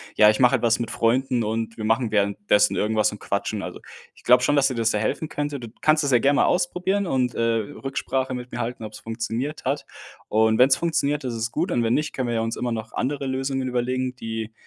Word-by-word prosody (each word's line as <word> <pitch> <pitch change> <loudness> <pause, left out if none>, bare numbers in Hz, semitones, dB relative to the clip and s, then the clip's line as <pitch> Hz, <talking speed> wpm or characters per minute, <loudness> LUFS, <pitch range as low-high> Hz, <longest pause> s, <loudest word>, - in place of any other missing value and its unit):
„Ja, 105 - +7
ich 105 - +1
mache 125 -2 +5
etwas 115 -1 +1
mit 115 -1 -3
Freunden 125 +1 +1
und 110 +1 -3
wir 110 - -6
machen 115 +1 +1
währenddessen 105 0 +2
irgendwas 110 0 +1
und 105 - -9
quatschen.“ 100 +1 -2
Also, - - -7 0.3
ich - - -21
glaube 125 0 +5
schon, 145 - +3
dass 140 -1 +4
dir 130 - -3
das 115 -1 +1
sehr 105 - -1
helfen 155 +8 -1
könnte. 145 -1 -3
D 120 - -8
du 110 - -16
kannst 155 0 +3
es 140 - 0
ja 125 - +5
gern 140 +4 +3
mal - - +4
ausprobieren 180 +2 0
und, 125 -5 0
äh, - - -1
Rücksprache 130 +3 -2
mit 125 0 -6
mir - - -5
halten, 120 0 -4
ob's 105 0 -9
funktioniert 115 +6 -4
hat. 140 +3 -1 0.4
Und 110 0 +3
wenn's 130 +1 +6
funktioniert, 150 -3 0
ist 125 - -2
es 115 +1 -3
gut - - -1
und 120 - +1
wenn 115 +1 +2
nicht, 150 +1 -1
können 130 -2 -2
wir 120 - -1
ja 115 - +1
uns 115 0 -2
immer 125 -1 -2
noch 110 0 -5
andere 140 +1 -2
Lösungen 135 0 -2
überlegen, 125 +1 -1
die, 115 -2 -5
120 Hz, 240 wpm, -24 LUFS, 115-135 Hz, 0.4 s, Ja